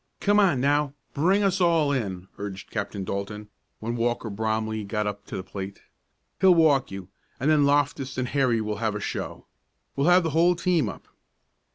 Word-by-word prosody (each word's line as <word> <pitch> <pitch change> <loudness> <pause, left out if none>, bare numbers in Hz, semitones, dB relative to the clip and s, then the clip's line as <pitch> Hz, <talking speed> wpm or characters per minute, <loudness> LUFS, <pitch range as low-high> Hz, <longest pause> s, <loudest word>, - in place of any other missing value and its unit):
"Come 205 +1 +3
on 180 -10 +3
now, 145 +1 +1 0.2
bring 190 +8 +2
us 195 -1 +1
all 165 -4 +3
in!" 95 -9 -3
urged 100 -1 -7
Captain 100 -2 -3
Dalton, 100 +2 -5 0.3
when 115 +2 -3
Walker 120 -1 -1
Bromley 110 +1 -2
got 105 +1 -2
up 100 0 -4
to - - -5
the 95 - -5
plate. 95 +1 -7 0.6
"He'll 185 -2 +6
walk 145 -5 +4
you, 95 -1 -8 0.3
and 145 +4 +2
then 145 -2 +4
Loftus 140 -2 0
and 130 -1 -1
Harry 130 -5 +2
will 105 -1 -3
have 110 -1 -1
a - - -2
show. - - -5 0.5
We'll 140 +1 +1
have 180 0 +6
the 165 - -1
whole 170 +3 +4
team 175 -2 +1
up." - - -10
125 Hz, 185 wpm, -25 LUFS, 105-155 Hz, 0.6 s, He'll